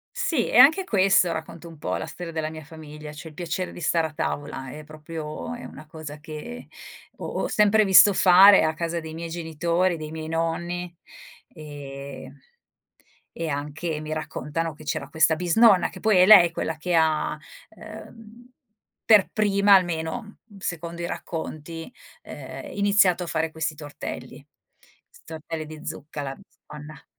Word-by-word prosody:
Sì, 275 Hz, -9 st, 0 dB
e -, -, +2 dB
anche 310 Hz, +9 st, +7 dB
questo, 195 Hz, -, +3 dB
racconto 165 Hz, +1 st, -7 dB
un 165 Hz, -2 st, -13 dB
po' 90 Hz, -, -3 dB
la -, -, -4 dB
storia 175 Hz, -2 st, -8 dB
della 160 Hz, -1 st, -3 dB
mia 155 Hz, -1 st, -9 dB
famiglia, 150 Hz, -1 st, -10 dB
cioè 150 Hz, +2 st, -10 dB
il 155 Hz, -, -15 dB
piacere 175 Hz, +2 st, -4 dB
di -, -, -10 dB
stare 165 Hz, 0 st, +1 dB
a -, -, -16 dB
tavola 145 Hz, -3 st, -4 dB
è 155 Hz, -, -9 dB
proprio 155 Hz, +6 st, -7 dB
è 245 Hz, -, -9 dB
una 155 Hz, -, -11 dB
cosa 155 Hz, -2 st, -9 dB
che 150 Hz, -, -9 dB, 0.5 s
ho -, -, -6 dB
ho -, -, -3 dB
sempre 210 Hz, +1 st, +4 dB
visto 195 Hz, +1 st, +7 dB
fare 190 Hz, +2 st, +7 dB
a 155 Hz, 0 st, 0 dB
casa 170 Hz, +1 st, -3 dB
dei 160 Hz, -1 st, -8 dB
miei 165 Hz, +1 st, -6 dB
genitori, 170 Hz, +2 st, -1 dB
dei 155 Hz, -1 st, -7 dB
miei 160 Hz, 0 st, -6 dB
nonni, 170 Hz, +2 st, -3 dB, 0.6 s
ehm, 140 Hz, -3 st, -9 dB, 1.0 s
e 165 Hz, -1 st, -3 dB
anche, 150 Hz, +3 st, -4 dB
mi 155 Hz, 0 st, -5 dB
raccontano, 155 Hz, +1 st, -4 dB
che 155 Hz, +1 st, -15 dB
c'era 145 Hz, -2 st, -3 dB
questa 160 Hz, +1 st, +3 dB
bisnonna, 185 Hz, +4 st, +4 dB
che -, -, -12 dB
poi 215 Hz, -3 st, +3 dB
è 180 Hz, -, +7 dB
lei 185 Hz, -5 st, +8 dB
quella 160 Hz, -1 st, -3 dB
che 175 Hz, +2 st, -1 dB
ha, 155 Hz, -1 st, +1 dB, 0.3 s
ehm, 220 Hz, +2 st, -13 dB, 0.5 s
per 210 Hz, -3 st, +5 dB
prima 200 Hz, -1 st, +3 dB
almeno, 180 Hz, +4 st, 0 dB
mhmm, 205 Hz, -, -16 dB
secondo 170 Hz, -1 st, -5 dB
i -, -, -2 dB
racconti, 165 Hz, +2 st, -6 dB, 0.3 s
ehm, -, -, -9 dB
iniziato 200 Hz, -3 st, +3 dB
a -, -, -7 dB
fare 160 Hz, 0 st, -1 dB
questi 160 Hz, -1 st, -3 dB
tortelli, 145 Hz, -1 st, -8 dB, 0.6 s
'sti 480 Hz, -, -22 dB
tortelli 160 Hz, 0 st, -6 dB
di 155 Hz, 0 st, -11 dB
zucca, 145 Hz, 0 st, -6 dB
la 135 Hz, -1 st, -4 dB
bisnonna. 150 Hz, -5 st, -13 dB
165 Hz, 165 wpm, -24 LUFS, 155-185 Hz, 1.0 s, lei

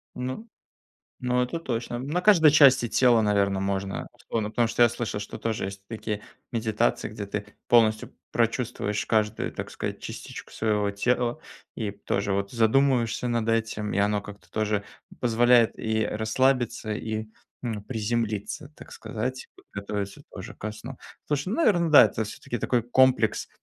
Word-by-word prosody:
Ну 130 Hz, -, -5 dB, 0.7 s
ну, 125 Hz, 0 st, +1 dB
это 125 Hz, +7 st, -3 dB
точно. 120 Hz, -5 st, -3 dB
На 150 Hz, +8 st, -2 dB
каждой 175 Hz, -7 st, +7 dB
части 135 Hz, -4 st, +6 dB
тела, 120 Hz, -1 st, +4 dB
наверно, 100 Hz, -2 st, +2 dB
можно. 95 Hz, 0 st, -2 dB, 0.2 s
Но 110 Hz, -2 st, 0 dB
потому 115 Hz, +1 st, +1 dB
что 120 Hz, -, +4 dB
я -, -, +7 dB
слышал, 115 Hz, -3 st, -3 dB
что 100 Hz, -, -7 dB
тоже 115 Hz, -1 st, -2 dB
есть 100 Hz, 0 st, -7 dB
такие 110 Hz, -2 st, -4 dB, 0.3 s
медитации, 115 Hz, 0 st, 0 dB
где 105 Hz, -1 st, -6 dB
ты 105 Hz, +1 st, -4 dB, 0.2 s
полностью 110 Hz, -2 st, +3 dB, 0.2 s
прочувствуешь 115 Hz, -3 st, -1 dB
каждую, 110 Hz, -1 st, 0 dB
так -, -, -6 dB
сказать, -, -, -5 dB
частичку -, -, -8 dB
своего 105 Hz, -2 st, 0 dB
тела 120 Hz, +6 st, 0 dB, 0.3 s
и 105 Hz, -3 st, -3 dB
тоже 100 Hz, 0 st, -2 dB
вот 100 Hz, 0 st, -1 dB
задумываешься 125 Hz, +1 st, +2 dB
над 115 Hz, -1 st, 0 dB
этим. 110 Hz, -2 st, -1 dB
И -, -, -1 dB
оно 105 Hz, 0 st, +2 dB
как-то 105 Hz, 0 st, -12 dB
тоже 105 Hz, -2 st, -1 dB, 0.3 s
позволяет 120 Hz, 0 st, +4 dB
и 110 Hz, -1 st, 0 dB
расслабиться, 115 Hz, 0 st, 0 dB
и, 110 Hz, 0 st, -3 dB, 0.4 s
м, 110 Hz, -4 st, -3 dB
приземлиться, 110 Hz, +2 st, -3 dB
так -, -, -12 dB
сказать, 115 Hz, +4 st, -5 dB, 0.2 s
готовиться 100 Hz, 0 st, -4 dB
тоже -, -, -8 dB
ко 110 Hz, -, -5 dB
сну. 105 Hz, -, -9 dB, 0.3 s
Слушай, 145 Hz, +3 st, -1 dB
ну, 210 Hz, -, -1 dB
наверно, 175 Hz, -, +3 dB
да, 145 Hz, -, +10 dB
это 110 Hz, -, -2 dB
всё-таки 110 Hz, +3 st, -6 dB
такой 125 Hz, +2 st, +1 dB
комплекс 125 Hz, -1 st, +2 dB
110 Hz, 150 wpm, -26 LUFS, 105-125 Hz, 0.7 s, да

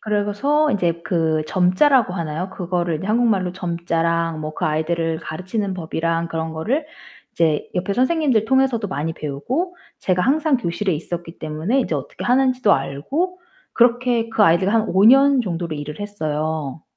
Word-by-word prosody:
그래서 215 Hz, +9 st, +1 dB
이제 170 Hz, -4 st, 0 dB
그 160 Hz, -3 st, +1 dB
점자라고 185 Hz, -, +3 dB
하나요? 170 Hz, +1 st, -4 dB
그거를 175 Hz, -3 st, -2 dB
이제 180 Hz, +6 st, -6 dB
한국말로 210 Hz, -5 st, +1 dB
점자랑 170 Hz, -2 st, -1 dB
뭐 155 Hz, 0 st, -5 dB
그 -, -, -3 dB
아이들을 160 Hz, +1 st, -1 dB
가르치는 190 Hz, +5 st, -4 dB
법이랑 165 Hz, -1 st, -2 dB
그런 160 Hz, -1 st, -3 dB
거를 240 Hz, -, -1 dB, 0.5 s
이제 160 Hz, -3 st, +1 dB
옆에 185 Hz, +2 st, -1 dB
선생님들 260 Hz, -2 st, +2 dB
통해서도 255 Hz, -3 st, +1 dB
많이 160 Hz, 0 st, -3 dB
배우고, 255 Hz, -, -3 dB, 0.2 s
제가 185 Hz, -1 st, +1 dB
항상 290 Hz, -, +2 dB
교실에 190 Hz, -2 st, -2 dB
있었기 170 Hz, +2 st, -6 dB
때문에 160 Hz, -, -1 dB
이제 -, -, -2 dB
어떻게 -, -, -5 dB
하는지도 255 Hz, -3 st, +3 dB
알고 315 Hz, -, -2 dB, 0.3 s
그렇게 240 Hz, -1 st, +2 dB
그 220 Hz, -1 st, +1 dB
아이들과 185 Hz, +2 st, +4 dB
한 220 Hz, -1 st, +2 dB
5 190 Hz, +2 st, +3 dB
년 270 Hz, +2 st, +6 dB
정도로 170 Hz, -6 st, -3 dB
일을 150 Hz, +4 st, -7 dB
했어요. 155 Hz, -6 st, -3 dB
185 Hz, 355 characters per minute, -21 LUFS, 165-240 Hz, 0.5 s, 년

